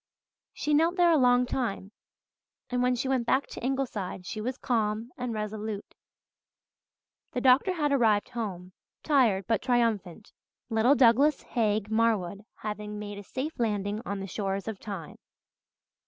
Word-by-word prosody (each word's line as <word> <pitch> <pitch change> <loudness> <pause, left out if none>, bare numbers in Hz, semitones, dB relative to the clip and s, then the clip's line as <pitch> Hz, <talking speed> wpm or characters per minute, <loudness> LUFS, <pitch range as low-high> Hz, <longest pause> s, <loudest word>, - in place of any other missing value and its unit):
She 300 - -2
knelt 325 +4 +3
there 350 -2 +5
a 320 - +5
long 250 -1 +4
time, 225 -6 -3 0.8
and 250 0 +1
when 250 0 +2
she 260 +2 -2
went 255 -3 0
back 265 +3 +2
to - - -9
Ingleside 235 -9 -2
she 215 - -5
was 255 +4 -3
calm 225 -2 -1
and 250 -1 -4
resolute. 215 -1 -5 1.4
The 250 - -1
doctor 265 +9 +5
had 300 -4 0
arrived 225 -6 +3
home, 190 -7 -5 0.3
tired 235 - +3
but 225 0 +1
triumphant, 225 -6 0 0.4
little 225 +5 +4
Douglas 270 +4 +4
Haig 215 -3 0
Marwood 215 -3 +1 0.2
having 210 0 -4
made 205 -1 -6
a - - -9
safe 265 +9 -5
landing 210 -2 -1
on 200 -3 -4
the 195 - -4
shores 195 +1 -3
of 220 -3 -4
time. 195 -7 -7
225 Hz, 150 wpm, -28 LUFS, 205-255 Hz, 1.4 s, there